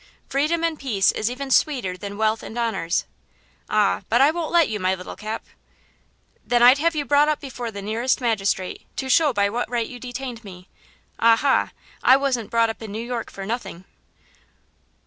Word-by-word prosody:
Freedom 310 +4 0
and 330 -2 -1
peace 210 -8 +2
is 215 - -2
even 265 +2 -5
sweeter 245 - +2
than 200 +2 -7
wealth 220 0 +1
and 225 - -8
honors." 220 -8 -1 0.6
"Ah, 210 -2 +2
but 235 - +3
I 280 +3 +6
won't 330 -1 -4
let 340 -2 +4
you, 215 -1 -3
my 185 0 +1
little 180 0 -9
Cap." 215 +1 -6 1.0
"Then 240 -1 +2
I'd 255 +3 +7
have 335 +2 +1
you 295 -1 -1
up 295 +2 +3
before 255 -4 -6
the 200 -2 -8
nearest 230 +5 0
magistrate, 200 -6 -1
to 265 - -4
show 300 +2 +4
by 200 -4 +2
what 235 +3 -3
right 235 -2 -1
you 245 - -9
detained 245 -1 -6
me. 185 -2 -12 0.5
Ah, 230 0 +6
ha! 275 +3 +2 0.3
I 260 - +6
wasn't 260 -6 -1
brought 230 -1 +2
up 225 - -13
in 220 -2 -7
New 220 +3 -5
York 240 -2 -4
for 195 - -8
nothing." 210 -5 -5
235 Hz, 185 wpm, -23 LUFS, 210-270 Hz, 1.0 s, I'd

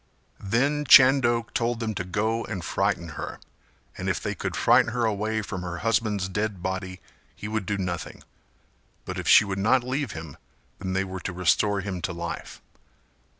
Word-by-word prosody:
Then 135 +9 +1
Chando 130 -3 +6
told 120 0 0
them 110 -2 -2
to 95 - -3
go 110 +5 -1
and 90 -3 -5
frighten 85 -1 -1
her, 75 - -6 0.6
and - - -3
if - - 0
they - - -3
could - - -4
frighten 120 - +4
her 120 -2 +1
away 110 0 -1
from 95 -2 -5
her 90 -1 -5
husband's 110 -4 +1
dead 100 -1 -3
body 95 0 -4 0.4
he 105 - -7
would 105 -3 -3
do 105 - -1
nothing, 90 -3 -4 0.8
but - - -5
if - - -5
she - - +7
would 100 -1 -3
not 120 +5 +3
leave 130 -2 -2
him 80 -3 -8 0.4
then 95 -1 -3
they 95 +1 +1
were 95 -1 -6
to 90 - -5
restore 100 +3 +2
him 95 -2 -4
to 90 0 -3
life. 85 -1 -6
100 Hz, 180 wpm, -26 LUFS, 95-115 Hz, 0.8 s, she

